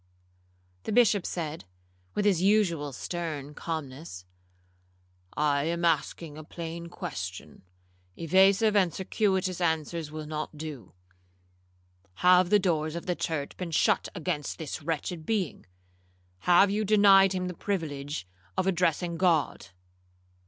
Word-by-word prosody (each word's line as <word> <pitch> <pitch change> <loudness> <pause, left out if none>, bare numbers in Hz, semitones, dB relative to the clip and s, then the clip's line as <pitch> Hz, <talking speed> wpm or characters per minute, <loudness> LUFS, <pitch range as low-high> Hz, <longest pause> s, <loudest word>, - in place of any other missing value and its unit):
The - - -5
Bishop 215 -4 +4
said, 160 - -4 0.5
with 205 - 0
his 190 -5 +3
usual 185 -8 +2
stern 150 0 -5
calmness, 145 - -6 1.1
'I 145 -1 +2
am 170 +1 -1
asking 160 -1 -1
a - - -8
plain 170 +1 -7
question—evasive 90 - -1
and 185 -4 +4
circuitous 190 0 -1
answers 160 -1 -1
will 155 0 -6
not 155 0 -5
do. 145 - -8 1.3
Have 180 0 +6
the 210 - +6
doors 160 -5 0
of 170 - -5
the 180 - 0
church 155 -5 -3
been 180 -2 -4
shut 160 - +2
against 160 -4 -3
this 160 -2 -5
wretched 165 +2 -3
being?—have 90 - -1
you 210 +1 0
denied 195 -2 +6
him 185 -1 -2
the 180 - -4
privilege 150 - -4 0.3
of - - +1
addressing 175 -2 +1
God?' 165 - +1
165 Hz, 115 wpm, -28 LUFS, 145-185 Hz, 1.3 s, Have